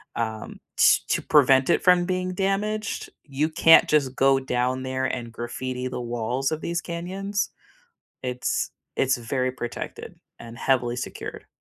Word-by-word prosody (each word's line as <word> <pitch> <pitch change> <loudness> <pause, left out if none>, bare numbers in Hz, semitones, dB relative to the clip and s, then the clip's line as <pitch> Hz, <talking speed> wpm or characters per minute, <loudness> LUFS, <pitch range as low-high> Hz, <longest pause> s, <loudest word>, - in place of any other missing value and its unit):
um, 110 -2 -4 0.2
to - - +6
to - - 0
prevent 135 -2 +4
it - - +2
from 180 -1 +5
being 185 0 -2
damaged, 205 +3 -1
you 145 +2 -1
can't 165 0 +6
just 140 -4 +2
go 135 0 +4
down 130 0 -1
there 130 0 -2
and 120 -3 -3
graffiti 125 +2 -4
the 125 - -4
walls 120 +3 -2
of 155 0 -3
these 170 0 -2
canyons. 190 +4 -3 0.7
It's 125 -1 -2 0.3
it's 135 0 +2
very 125 +2 -1
protected 120 -2 -7 0.2
and 115 0 -10
heavily 125 -2 +1
secured. - - -6
130 Hz, 145 wpm, -25 LUFS, 125-170 Hz, 0.7 s, to